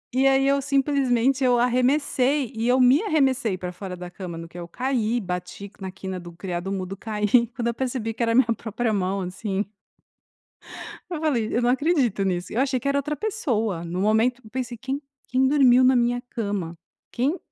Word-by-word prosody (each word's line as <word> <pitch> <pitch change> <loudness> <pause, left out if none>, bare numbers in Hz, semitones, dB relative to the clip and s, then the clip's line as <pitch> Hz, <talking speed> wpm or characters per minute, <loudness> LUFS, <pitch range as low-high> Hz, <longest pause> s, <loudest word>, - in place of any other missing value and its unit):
E 265 +1 +3
aí 270 0 +4
eu 280 0 +3
simplesmente 270 -2 +2
eu 245 -1 +4
arremessei, 255 +2 +2
e 225 +1 -2
eu 255 +1 +4
me 255 - +5
arremessei 270 - +1
pra 180 0 -5
fora 185 +1 -7
da 175 0 -7
cama 175 -2 -7
no 165 0 -7
que 170 - -13
eu 175 - -6
caí, 245 +3 -1
bati 180 0 -5
na 190 - -5
quina 190 0 -6
do 175 -1 -9
criado-mudo, 185 +2 -4
caí, 210 0 -2 0.3
quando 235 -1 -2
eu 235 - 0
percebi 240 -2 -3
que 235 - -2
era 230 - +2
a - - +1
minha 245 -3 +4
própria 225 +1 -2
mão, 195 0 0
assim. 195 +2 -3 1.4
Eu 335 -4 -4
falei: 245 -9 0
"Eu 240 - +2
não 240 - +2
acredito 260 - +2
nisso". 180 -1 -2
Eu 235 - 0
achei 265 -2 +1
que 280 - -4
era 280 - +2
outra 300 +2 -3
pessoa, 230 - -1
no 175 +2 -3
momento 225 +4 +2
eu 215 - -14
pensei: 245 -2 -4
"Quem 270 +4 -4 0.3
quem 260 +1 +3
dormiu 260 -3 +5
na 255 0 +5
minha 245 0 +1
cama? 200 -7 -3 0.3
Quem 275 +9 0
240 Hz, 195 wpm, -24 LUFS, 195-265 Hz, 1.4 s, me